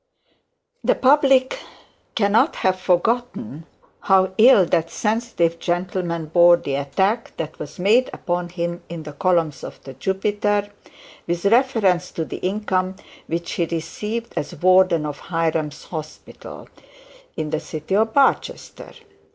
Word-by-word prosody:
The - - +3
public 270 - +3 0.6
cannot 225 +7 +2
have 185 0 0
forgotten 200 - -1 0.3
how 190 -1 +2
ill 220 -5 +7
that 165 -1 0
sensitive 210 -7 -1
gentleman 175 -2 -2
bore 175 +2 +5
the 140 - -5
attack 190 - -1
that 155 -1 -6
was 150 -1 -8
made 220 +8 +3
upon 175 0 -3
him 175 0 -4
in 170 -2 -7
the 150 -1 -9
columns 170 -3 0
of - - -9
the 135 - -9
Jupiter, 205 +4 -1 0.6
with 175 +2 -2
reference 210 -6 +2
to 165 - -3
the - - -7
income 190 -1 -1 0.3
which 170 +1 -3
he 170 - 0
received 210 +8 -5
as 160 +4 -4
warden 185 -1 +3
of 145 -1 -5
Hiram's 160 -3 -1
Hospital, 155 -2 -9 0.7
in 155 -1 -3
the 155 - 0
city 155 +5 -4
of 220 +2 +2
Barchester. 275 +2 0
185 Hz, 130 wpm, -21 LUFS, 165-210 Hz, 0.7 s, ill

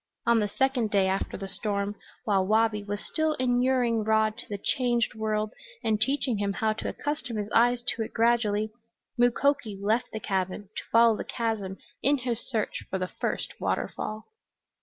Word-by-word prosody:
On 235 -1 +5
the 210 - +1
second 250 +1 +1
day 200 -2 +3
after 190 +1 -1
the 195 - -5
storm, 200 0 -2 0.3
while 195 -3 +3
Wabi 215 +1 +2
was 205 0 -4
still 315 -1 0
inuring 245 -2 +2
Rod 220 0 +2
to - - -7
the 205 - -3
changed 240 +2 +1
world 215 -1 -1 0.3
and 215 -1 +1
teaching 260 -3 +1
him 200 -1 0
how 220 +2 +1
to 215 - -4
accustom 290 -6 -3
his 210 0 -3
eyes 240 +1 +4
to 235 - -1
it 220 - -3
gradually, 220 -2 +2 0.4
Mukoki 245 -2 +2
left 220 +5 +1
the 220 - -4
cabin 190 0 -2
to - - -4
follow 230 -1 +6
the - - -4
chasm 215 -5 -2 0.2
in 285 +2 +3
his 240 -3 -2
search 225 -5 -2
for 190 - -1
the 185 -1 -2
first - - -2
waterfall. 215 +1 -2
220 Hz, 175 wpm, -28 LUFS, 205-240 Hz, 0.4 s, follow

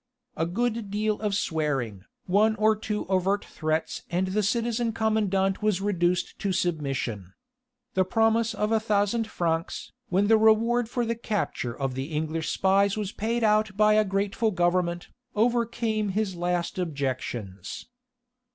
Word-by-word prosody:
A 165 +1 0
good 230 +3 -1
deal 210 +1 0
of 210 -2 0
swearing, 135 - -1 0.2
one 210 +4 +3
or 215 0 +3
two 210 0 -3
overt 190 +2 +1
threats 155 0 -2
and 185 +2 0
the 210 +3 +1
citizen 230 +2 0
commandant 205 -4 +1
was 210 -3 +1
reduced 180 -3 0
to 200 - -1
submission. 135 - -2 0.6
The 185 - +3
promise 225 +3 +2
of 210 +1 -1
a 225 - +4
thousand 215 +1 +1
francs, 165 -5 -2 0.2
when 190 +3 +2
the 220 +1 +5
reward 225 +2 +3
for 240 0 -1
the 230 - 0
capture 210 - -3
of 135 -2 -1
the 130 +1 -3
English 160 +1 -2
spies 195 +1 +2
was 205 -2 -2
paid 230 +3 -1
out 215 -2 +2
by 215 0 +5
a 215 0 +5
grateful 200 +3 0
Government, 175 -2 0 0.3
overcame 230 -1 +1
his 195 -1 -1
last 175 +1 -1
objections. 130 - -4
200 Hz, 145 wpm, -26 LUFS, 175-220 Hz, 0.6 s, the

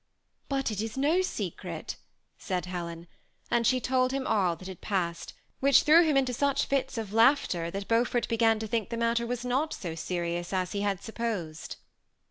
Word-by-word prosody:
^ - - -50 0.5
But 270 -4 0
it 210 -1 -2
is 220 +2 -5
no 305 +7 +3
secret," 370 - -4 0.4
said 180 -2 -2
Helen; 170 -2 -5 0.5
and 235 -1 +3
she 255 - +3
told 255 +1 +1
him 270 -1 -2
all 185 -8 +2
that 185 +3 -11
had 190 -2 -9
passed, 175 -4 -2 0.2
which 275 0 +5
threw 325 +3 +7
him 305 -4 +2
into 260 -2 +2
such 280 +2 +1
fits 265 -2 -1
of 215 -3 -4
laughter, 225 - +3
that 195 +2 -5
Beaufort 235 +1 +1
began 225 -1 +3
to 220 - -4
think 220 0 -1
the 230 - -3
matter 235 0 +1
was 245 0 -3
not 270 +6 0
so 170 -4 -5
serious 175 +1 -3
as 185 -1 0
he 200 - -2
had 200 -2 -1
supposed. 210 -9 -4
225 Hz, 190 wpm, -29 LUFS, 185-255 Hz, 0.5 s, threw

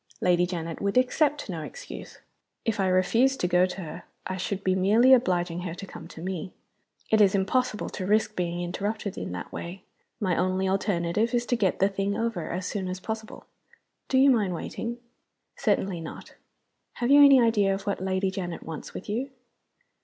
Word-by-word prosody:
Lady 180 -1 +3
Janet 165 -2 -5
would 200 +3 0
accept 290 +3 +2
no 170 -5 -4
excuse. - - -9 0.5
If 225 -3 0
I 190 - +2
refused 225 +9 +3
to 180 - +2
go 180 +1 +4
to 185 +1 -6
her 155 -3 -8 0.2
I 185 - -3
should 190 +1 -3
be 185 - +2
merely 215 +8 +5
obliging 175 -8 +2
her 175 -2 -5
to 195 - -7
come - - -10
to 160 - -10
me. 185 0 -4 0.6
It 220 -1 +5
is 200 -1 +5
impossible 210 +3 0
to 185 - -5
risk 215 +1 +2
being 175 -1 -2
interrupted 200 +3 -3
in - - -5
that 90 - -6
way; 180 +2 -7 0.4
my 185 -6 +1
only 185 +1 +1
alternative 195 +3 0
is 240 0 +1
to 245 - +1
get 200 -6 +1
the 195 - +4
thing 200 0 -2
over 230 -7 -2
as 180 +2 -3
soon 195 -2 -3
as 185 0 -4
possible. 220 +2 -6 0.6
Do 260 - +2
you 270 +1 +7
mind 205 -7 +1
waiting?" 230 +7 -5 0.6
"Certainly 185 -4 0
not. 160 - -9 0.6
Have 245 +2 -1
you 290 0 +9
any 275 -2 +8
idea 220 -4 +3
of 195 - -7
what 200 -2 -2
Lady 190 0 0
Janet 180 -3 -5
wants 160 -2 -8
with - - -7
you?" 240 +6 -2
195 Hz, 190 wpm, -27 LUFS, 180-225 Hz, 0.6 s, you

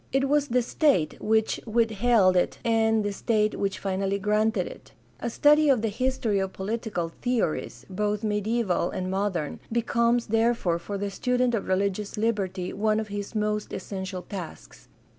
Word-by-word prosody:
It 270 +1 +2
was 290 0 +2
the 250 -1 +2
state 245 - +1
which 220 0 +1
withheld 225 -3 +3
it 180 - +1
and 225 -1 +3
the 205 - -1
state 215 +1 0
which 195 -1 -1
finally 195 0 -1
granted 210 -1 +1
it. - - -11 0.3
A 240 - -2
study 295 +5 +4
of 250 -5 +3
the 225 - +1
history 240 -2 0
of 190 0 -2
political 205 -4 -3
theories, 240 -10 -1
both 210 +2 -2
mediaeval 210 -3 0
and 185 0 -3
modern, 190 -6 -2
becomes, 235 +1 +1
therefore, 225 -6 +1
for 200 +4 -5
the 200 0 -3
student 250 +3 +1
of 225 - -1
religious 200 +2 -1
liberty 195 -5 -1
one 215 +1 +1
of 215 -1 -4
his 205 +2 -5
most 210 0 -1
essential 190 -2 -5
tasks. 180 -3 -9
210 Hz, 160 wpm, -26 LUFS, 195-235 Hz, 0.3 s, study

